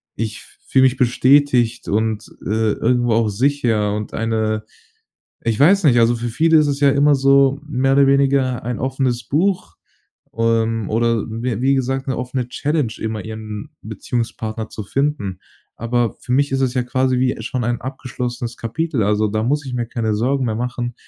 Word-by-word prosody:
Ich 110 Hz, -1 st, -3 dB
f -, -, -16 dB
fühle 130 Hz, -, +4 dB
mich 130 Hz, 0 st, +2 dB
bestätigt 125 Hz, -1 st, +3 dB
und, 110 Hz, +1 st, -1 dB, 0.2 s
äh, 110 Hz, +2 st, +1 dB
irgendwo 120 Hz, 0 st, +1 dB
auch 110 Hz, -1 st, +2 dB
sicher 115 Hz, -3 st, +1 dB
und 105 Hz, 0 st, -5 dB
eine 110 Hz, -1 st, -1 dB, 0.8 s
ich 115 Hz, -2 st, -1 dB
weiß 185 Hz, +7 st, +5 dB
nicht, 125 Hz, -5 st, +5 dB
also 115 Hz, +1 st, +3 dB
für 120 Hz, +1 st, -3 dB
viele 160 Hz, +7 st, +3 dB
ist 150 Hz, -, +3 dB
es 140 Hz, -1 st, -2 dB
ja 140 Hz, -1 st, +5 dB
immer 145 Hz, +1 st, +4 dB
so, 135 Hz, 0 st, +3 dB
mehr 135 Hz, -2 st, +1 dB
oder 140 Hz, 0 st, +5 dB
weniger 135 Hz, -2 st, +2 dB
ein 120 Hz, 0 st, -3 dB
offenes 130 Hz, -2 st, -1 dB
Buch, 185 Hz, +5 st, 0 dB, 0.6 s
ähm, 115 Hz, -1 st, 0 dB
oder 115 Hz, 0 st, +1 dB
wie 115 Hz, 0 st, -3 dB
wie 135 Hz, +1 st, +3 dB
gesagt, 135 Hz, 0 st, -1 dB
'ne 130 Hz, -, -1 dB
offene 125 Hz, 0 st, -3 dB
Challenge, 145 Hz, -3 st, -1 dB
immer 110 Hz, -2 st, -4 dB
ihren 110 Hz, -1 st, -7 dB
Beziehungspartner 110 Hz, 0 st, -4 dB
zu 110 Hz, -, -6 dB
finden. 135 Hz, -6 st, -2 dB, 0.4 s
Aber 120 Hz, 0 st, -1 dB
für 125 Hz, -, -4 dB
mich 140 Hz, +2 st, +2 dB
ist 135 Hz, -, 0 dB
es 130 Hz, -2 st, 0 dB
ja 125 Hz, -, +1 dB
quasi 130 Hz, +1 st, 0 dB
wie 130 Hz, 0 st, +1 dB
schon 120 Hz, +2 st, -3 dB
ein 120 Hz, 0 st, -1 dB
abgeschlossenes 125 Hz, -2 st, -5 dB
Kapitel. 140 Hz, +2 st, -2 dB
Also, 105 Hz, +1 st, +1 dB
da 110 Hz, +1 st, -1 dB
muss 145 Hz, +4 st, 0 dB
ich 130 Hz, -, -5 dB
mir 120 Hz, -1 st, -2 dB
keine 115 Hz, -2 st, -2 dB
Sorgen 130 Hz, +5 st, 0 dB
mehr 110 Hz, -, -1 dB
machen, 120 Hz, 0 st, -3 dB
120 Hz, 180 wpm, -19 LUFS, 110-135 Hz, 0.8 s, weiß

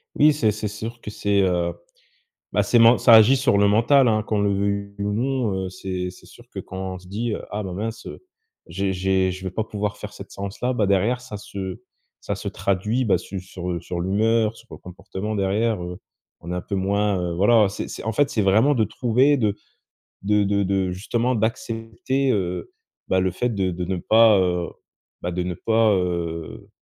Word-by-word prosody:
Oui, 150 Hz, +1 st, +6 dB
c'est 115 Hz, -7 st, +2 dB
c'est 105 Hz, +1 st, -4 dB
sûr 115 Hz, +3 st, -7 dB
que -, -, -7 dB
c'est, 100 Hz, -1 st, +1 dB
heu 90 Hz, -2 st, +1 dB, 0.8 s
bah -, -, +2 dB
c'est 120 Hz, -, +3 dB
ment 115 Hz, +1 st, +7 dB
ça 120 Hz, -, +4 dB
agit 110 Hz, +4 st, +8 dB
sur 125 Hz, -6 st, +2 dB
le 100 Hz, 0 st, +4 dB
mental, 120 Hz, +5 st, +4 dB
hein 110 Hz, -1 st, +2 dB
qu'on 105 Hz, -1 st, -1 dB
le 100 Hz, 0 st, +2 dB
veuille 100 Hz, 0 st, -2 dB
ou 100 Hz, 0 st, -1 dB
non. 125 Hz, -1 st, 0 dB
Heu, -, -, -4 dB
c'est 90 Hz, -1 st, -4 dB
c'est 90 Hz, -, -17 dB
sûr -, -, -17 dB
que -, -, -10 dB
quand 95 Hz, 0 st, -5 dB
on -, -, -7 dB
se 90 Hz, -, -17 dB
dit, 110 Hz, +4 st, -3 dB
heu: -, -, -6 dB
«Ah 105 Hz, +1 st, -3 dB
bah 90 Hz, -2 st, -5 dB
mince, 115 Hz, +3 st, -5 dB
heu, -, -, -9 dB, 0.4 s
j'ai 95 Hz, +2 st, -2 dB
j'ai 95 Hz, 0 st, +1 dB
je 95 Hz, +1 st, -7 dB
vais 95 Hz, -, -3 dB
pas 110 Hz, +4 st, -2 dB
pouvoir 105 Hz, -1 st, -4 dB
faire 105 Hz, -, -8 dB
cette 100 Hz, -, -10 dB
séance 100 Hz, +3 st, -7 dB
là» 125 Hz, +1 st, +1 dB
bah 110 Hz, -5 st, +1 dB
derrière, 105 Hz, +6 st, +1 dB
ça 125 Hz, -4 st, -8 dB
se 95 Hz, -2 st, -7 dB, 0.4 s
ça -, -, -2 dB
se -, -, -5 dB
traduit, 105 Hz, +6 st, -1 dB
bah 105 Hz, -, +3 dB
su 95 Hz, -1 st, -7 dB
sur, 90 Hz, -1 st, -6 dB
heu 85 Hz, -1 st, -2 dB
sur 85 Hz, 0 st, -4 dB
l'humeur, 110 Hz, +4 st, +1 dB
sur -, -, -17 dB
le -, -, -9 dB
comportement. 95 Hz, +3 st, -6 dB
Derrière, 100 Hz, +1 st, 0 dB
heu, 90 Hz, 0 st, -7 dB, 0.4 s
on 85 Hz, -, -8 dB
est 90 Hz, -, -2 dB
un 90 Hz, -, -3 dB
peu 100 Hz, -, -5 dB
moins, 100 Hz, +1 st, +1 dB
heu 85 Hz, -1 st, -2 dB
voilà 105 Hz, +2 st, +4 dB
c'est 95 Hz, -, -5 dB
c'est -, -, -7 dB
en 110 Hz, -, -1 dB
fait 140 Hz, +3 st, +2 dB
c'est 110 Hz, -, 0 dB
vraiment 110 Hz, +9 st, +4 dB
de 110 Hz, -3 st, +2 dB
trouver 130 Hz, +7 st, +2 dB
de 105 Hz, -5 st, +1 dB, 0.7 s
de 105 Hz, +1 st, +2 dB
de 100 Hz, 0 st, +1 dB
de 95 Hz, -1 st, 0 dB
justement 115 Hz, +6 st, -1 dB
d'accepter. 115 Hz, +4 st, -1 dB
Heu, 90 Hz, -3 st, -3 dB, 0.3 s
bah, 95 Hz, -, +2 dB
le 95 Hz, 0 st, +1 dB
fait 120 Hz, +7 st, -1 dB
de 95 Hz, -2 st, 0 dB
de 90 Hz, +1 st, -4 dB
ne 95 Hz, +1 st, -2 dB
pas, 110 Hz, +1 st, +5 dB
heu, 90 Hz, -1 st, 0 dB, 0.5 s
bah, 90 Hz, -, -2 dB
de 90 Hz, +1 st, -2 dB
ne 90 Hz, -1 st, -3 dB
pas, 110 Hz, +2 st, +2 dB
heu 85 Hz, -3 st, -3 dB
100 Hz, 220 wpm, -23 LUFS, 95-115 Hz, 0.8 s, agit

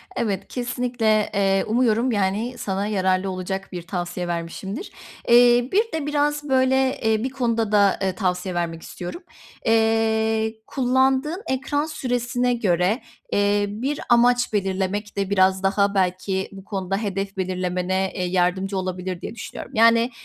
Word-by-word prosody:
Evet, 200 Hz, -4 st, -2 dB
kesinlikle, 240 Hz, -3 st, 0 dB
eee, 195 Hz, -1 st, +2 dB
umuyorum, 235 Hz, +1 st, +2 dB
yani, 210 Hz, +4 st, -1 dB
sana 195 Hz, +1 st, -2 dB
yararlı 190 Hz, -2 st, +1 dB
olacak 190 Hz, +1 st, -4 dB
bir 180 Hz, -2 st, -5 dB
tavsiye 175 Hz, -1 st, -3 dB
vermişimdir. 175 Hz, -, -5 dB, 0.4 s
Eee, 240 Hz, +1 st, +6 dB
bir 440 Hz, +4 st, +2 dB
de 320 Hz, -3 st, -2 dB
biraz, 295 Hz, 0 st, 0 dB
böyle, 265 Hz, 0 st, +2 dB
eee, 220 Hz, -1 st, +1 dB
bir 260 Hz, -, -1 dB
konuda 230 Hz, -4 st, -1 dB
da 200 Hz, -2 st, +4 dB, 0.2 s
tavsiye 180 Hz, -2 st, -1 dB
vermek 165 Hz, -1 st, -2 dB
istiyorum. 180 Hz, -, -8 dB, 0.4 s
Eee, 220 Hz, 0 st, +2 dB
kullandığın 265 Hz, -, +1 dB
ekran 285 Hz, +3 st, -1 dB
süresine 245 Hz, -4 st, -1 dB
göre, 195 Hz, 0 st, +1 dB, 0.3 s
eee, 205 Hz, 0 st, +2 dB
bir 255 Hz, +8 st, -3 dB
amaç 245 Hz, 0 st, +4 dB
belirlemek 195 Hz, +1 st, -2 dB
de 195 Hz, -1 st, -1 dB
biraz 190 Hz, -1 st, +3 dB
daha, 200 Hz, +1 st, +2 dB
belki, 190 Hz, 0 st, 0 dB
bu 195 Hz, -1 st, -11 dB
konuda 195 Hz, -1 st, -3 dB
hedef 195 Hz, -2 st, -3 dB
belirlemene, 185 Hz, 0 st, -1 dB
eee, 185 Hz, -, -2 dB
yardımcı 185 Hz, +2 st, 0 dB
olabilir 185 Hz, -1 st, -4 dB
diye -, -, -6 dB
düşünüyorum. 215 Hz, -, -8 dB
Yani, 230 Hz, +2 st, +5 dB
205 Hz, 135 wpm, -23 LUFS, 190-245 Hz, 0.4 s, Eee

